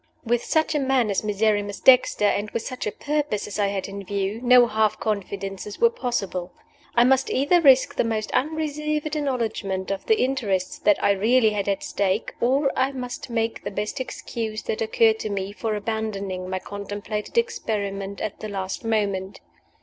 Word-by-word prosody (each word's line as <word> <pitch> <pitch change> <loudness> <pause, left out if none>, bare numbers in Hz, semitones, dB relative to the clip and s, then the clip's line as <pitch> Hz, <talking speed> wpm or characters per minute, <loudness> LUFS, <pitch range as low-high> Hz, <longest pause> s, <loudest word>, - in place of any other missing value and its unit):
WITH 240 +1 +1
such 315 0 +1
a 300 - +1
man 265 -5 +2
as 195 - 0
Miserrimus 205 -1 0
Dexter, 250 -4 +5
and 205 +1 +1
with 230 - -3
such 255 - -4
a - - -1
purpose 290 -7 -2
as 210 0 -6
I 200 - +3
had 195 -1 -3
in 200 0 -7
view, 200 +3 -2
no 250 0 +7
half 215 -1 +1
confidences 200 -1 -4
were 470 0 +5
possible. 195 - -3 0.4
I 235 - +6
must 265 +1 +3
either 290 +7 +3
risk 270 -4 +5
the - - +1
most 220 -2 -2
unreserved 305 +1 -1
acknowledgment 225 -9 -2
of 195 - -4
the 440 - +3
interests 210 -9 0
that 205 - +4
I - - +5
really 220 +3 +3
had 205 -1 -2
at 195 - -1
stake, 200 +2 -1
or 270 +3 +2
I 265 +1 +1
must 250 -1 -6
make 230 -1 -2
the - - -3
best 210 +6 -3
excuse 225 -4 -4
that 215 - -3
occurred 220 0 +3
to 215 - -3
me 195 -1 -3
for 210 +2 -3
abandoning 200 -4 -3
my 185 - -1
contemplated 205 - -5
experiment 200 - -2
at 215 - -4
the 215 - -6
last 190 0 -4
moment. 200 -4 -1
215 Hz, 180 wpm, -24 LUFS, 200-255 Hz, 0.4 s, no